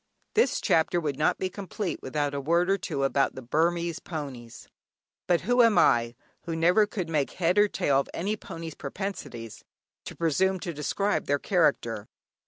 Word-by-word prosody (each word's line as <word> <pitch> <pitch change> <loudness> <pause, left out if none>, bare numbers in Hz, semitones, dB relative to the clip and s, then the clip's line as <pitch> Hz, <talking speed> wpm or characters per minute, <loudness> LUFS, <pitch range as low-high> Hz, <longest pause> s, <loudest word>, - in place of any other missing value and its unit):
This 455 - +3
chapter 165 +2 +2
would 145 -4 -3
not 155 - +2
be 190 - -1
complete 195 0 -5
without 145 +1 -2
a 140 - -2
word 170 +6 +2
or 195 - +3
two 140 -5 -3
about 135 0 +1
the 130 - -7
Burmese 170 +5 0
ponies; 135 -10 -7 0.6
but 175 -1 +3
who 245 +6 +3
am 230 -3 +5
I, 120 -1 +4 0.3
who 165 - -3
never 180 +6 +4
could 185 -4 -4
make 150 -4 -1
head 180 +3 +2
or 210 - +6
tail 140 -8 +1
of 140 - -3
any 200 +5 -2
pony's 165 -6 -8
propensities, 140 - -6 0.4
to - - -7
presume 185 +4 +1
to 175 -4 -4
describe 195 +7 -1
their 145 - +2
character? 135 - +1
165 Hz, 175 wpm, -27 LUFS, 140-190 Hz, 0.6 s, or